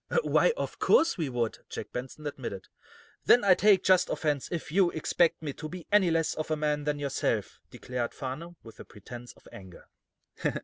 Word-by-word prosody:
"Why, -, -, +3 dB
of -, -, -4 dB
course 340 Hz, -7 st, +4 dB
we 160 Hz, -6 st, -2 dB
would," 120 Hz, -3 st, -2 dB
Jack -, -, -7 dB
Benson 130 Hz, +5 st, -7 dB
admitted. 125 Hz, -9 st, -6 dB, 0.6 s
"Then 245 Hz, -, +6 dB
I 195 Hz, -2 st, +7 dB
take 195 Hz, 0 st, +4 dB
just 185 Hz, -1 st, +4 dB
offense, 145 Hz, -4 st, -1 dB
if 170 Hz, -3 st, -4 dB
you 185 Hz, +1 st, +4 dB
expect 165 Hz, +1 st, +1 dB
me 145 Hz, -3 st, -3 dB
to 155 Hz, +2 st, -7 dB
be 180 Hz, -1 st, -8 dB
any 205 Hz, -4 st, +5 dB
less 165 Hz, -1 st, +1 dB
of 155 Hz, -, -5 dB
a 155 Hz, -, +1 dB
man 150 Hz, -1 st, -1 dB
than 150 Hz, 0 st, 0 dB
yourself," 140 Hz, -2 st, -2 dB
declared 125 Hz, -2 st, -4 dB
Farnum, 150 Hz, +7 st, -6 dB
with 115 Hz, -, -14 dB
a -, -, -8 dB
pretense 120 Hz, +4 st, -11 dB
of -, -, -21 dB
anger. 95 Hz, -3 st, -12 dB
155 Hz, 185 wpm, -29 LUFS, 130-175 Hz, 0.6 s, I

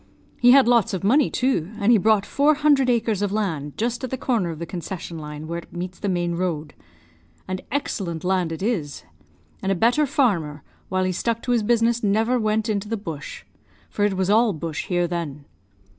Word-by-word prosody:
He 245 Hz, -, +5 dB
had 265 Hz, -1 st, +7 dB
lots 230 Hz, -3 st, +3 dB
of 190 Hz, -, -5 dB
money, 265 Hz, +8 st, +4 dB
too, 245 Hz, -8 st, 0 dB
and 210 Hz, +1 st, +3 dB
he 230 Hz, -, +6 dB
bought 210 Hz, 0 st, +3 dB
four 295 Hz, +2 st, +3 dB
hundred 285 Hz, -3 st, +3 dB
acres 225 Hz, -4 st, +1 dB
of 205 Hz, -1 st, 0 dB
land, 165 Hz, -9 st, -2 dB
just 240 Hz, +3 st, -2 dB
at 255 Hz, -, -2 dB
the 260 Hz, -, -3 dB
corner 230 Hz, -9 st, 0 dB
of 165 Hz, -, -5 dB
the 170 Hz, -, -5 dB
concession 170 Hz, -1 st, -6 dB
line, 150 Hz, 0 st, -7 dB
where 170 Hz, +1 st, -4 dB
it -, -, -15 dB
meets 180 Hz, +1 st, -6 dB
the 205 Hz, -, -2 dB
main 175 Hz, -1 st, 0 dB
road. 170 Hz, -4 st, -3 dB, 0.7 s
And 185 Hz, 0 st, -3 dB
excellent 185 Hz, -, -3 dB
land 180 Hz, -2 st, 0 dB
it 165 Hz, +3 st, -5 dB
is; 170 Hz, -, -2 dB, 0.6 s
and 195 Hz, -, -1 dB
a -, -, +2 dB
better 240 Hz, -, +3 dB
farmer, 175 Hz, -, 0 dB, 0.3 s
while 185 Hz, 0 st, 0 dB
he 185 Hz, -, 0 dB
stuck 230 Hz, +5 st, -2 dB
to 250 Hz, -, -1 dB
his 240 Hz, -2 st, +3 dB
business, 230 Hz, +1 st, +2 dB
never 225 Hz, +4 st, +2 dB
went 215 Hz, 0 st, 0 dB
into 210 Hz, -1 st, -2 dB
the 225 Hz, -, -1 dB
bush, 165 Hz, -8 st, -7 dB, 0.5 s
for 205 Hz, -, -1 dB
it 205 Hz, -2 st, +1 dB
was 190 Hz, +1 st, +1 dB
all 220 Hz, 0 st, +4 dB
bush 160 Hz, -1 st, -5 dB
here 175 Hz, -1 st, +1 dB
then. 160 Hz, -5 st, -4 dB
200 Hz, 205 wpm, -23 LUFS, 170-235 Hz, 0.7 s, had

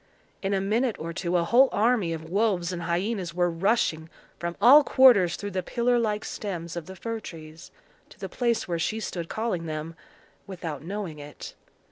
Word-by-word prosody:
In 195 Hz, 0 st, 0 dB
a -, -, +1 dB
minute 220 Hz, +4 st, 0 dB
or 165 Hz, +1 st, -5 dB
two 175 Hz, +1 st, -1 dB
a 170 Hz, -, +2 dB
whole 250 Hz, +9 st, +5 dB
army 215 Hz, -5 st, +2 dB
of 160 Hz, -1 st, -5 dB
wolves 185 Hz, -2 st, 0 dB
and 175 Hz, -, -4 dB
hyenas 175 Hz, +1 st, -2 dB
were 175 Hz, -1 st, +2 dB
rushing 165 Hz, -3 st, 0 dB, 0.3 s
from 170 Hz, 0 st, -4 dB
all 265 Hz, +8 st, +8 dB
quarters 245 Hz, -12 st, +5 dB
through 205 Hz, 0 st, -6 dB
the 185 Hz, 0 st, -1 dB
pillar 240 Hz, +6 st, +1 dB
like 215 Hz, -2 st, -1 dB
stems 175 Hz, -5 st, -5 dB
of 170 Hz, -1 st, -6 dB
the 190 Hz, -, -9 dB
fir 230 Hz, +4 st, -4 dB
trees, 160 Hz, -4 st, -11 dB, 0.4 s
to -, -, -17 dB
the -, -, -5 dB
place 235 Hz, -2 st, -1 dB
where 170 Hz, -2 st, -2 dB
she 215 Hz, +7 st, -1 dB
stood 175 Hz, -5 st, -5 dB
calling 215 Hz, -7 st, -2 dB
them, 155 Hz, +1 st, -5 dB, 0.5 s
without 170 Hz, -6 st, -6 dB
knowing 180 Hz, -2 st, -5 dB
it. 145 Hz, 0 st, -9 dB
185 Hz, 185 wpm, -26 LUFS, 170-220 Hz, 0.5 s, all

